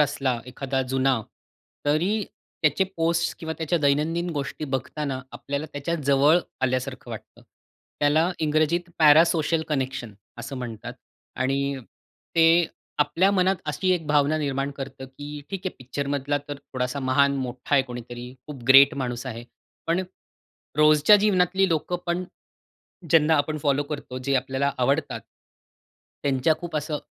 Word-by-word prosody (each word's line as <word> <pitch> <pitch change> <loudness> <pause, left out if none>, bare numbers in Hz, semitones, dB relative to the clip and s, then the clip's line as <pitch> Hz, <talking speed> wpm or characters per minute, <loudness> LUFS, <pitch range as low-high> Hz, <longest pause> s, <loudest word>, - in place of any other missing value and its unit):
असला 135 -4 +1
एखादा 135 -1 -2
जुना 135 0 +3 0.7
तरी 160 +7 +2 0.5
त्याचे 155 +5 +3
पोस्ट 165 +1 +1
किंवा 160 -1 -4
त्याच्या 165 +1 0
दैनंदिन 165 +5 +1
गोष्टी 145 0 -4
बघताना 135 +1 -3 0.2
आपल्याला 140 +2 -4
त्याच्या 145 +4 -2 0.2
जवळ 145 +5 +5 0.3
आल्यासारखं 130 0 -2
वाटतं. - - -10 0.6
त्याला 155 +4 +3
इंग्रजीत 155 +3 +1
पॅरासोशल 160 +1 +5
कनेक्शन 130 -6 -2 0.3
असं 120 +3 -6
म्हणतात 120 -4 -6 0.4
आणि 135 +1 0 0.6
ते 165 - +6 0.6
आपल्या 185 +6 +2
मनात 190 0 +2
अशी 185 +6 -1
एक 165 -4 -1
भावना 150 +1 +3
निर्माण 140 -1 -1
करतं 135 -1 -7
की 145 +2 -10 0.2
ठीक 195 -2 -3
आहे, 185 - -3
पिक्चरमधला 140 +2 -2
तर 145 - -4
थोडासा 130 -1 -4
महान 140 +1 +3
मोठा 125 +3 -3
आहे 135 - +5
कोणीतरी 120 -1 -8 0.2
खूप 140 -5 -9
ग्रेट 140 +2 +8
माणूस 125 0 -4
आहे, 120 -1 -6 0.4
पण 170 +3 +1 0.8
रोजच्या 155 +6 +7
जीवनातली 190 -1 +3
लोकं 165 +2 0
पण 175 +1 -1 0.9
ज्यांना 160 -1 +5
आपण 155 +2 0
फॉलो 145 0 +2
करतो 135 -3 -5
जे 135 +2 -1
आपल्याला 135 +2 0
आवडतात. 140 +4 0 1.0
त्यांच्या 140 +2 +2
खूप 170 -2 -6
असं 150 0 -2
145 Hz, 135 wpm, -25 LUFS, 135-160 Hz, 1.0 s, ग्रेट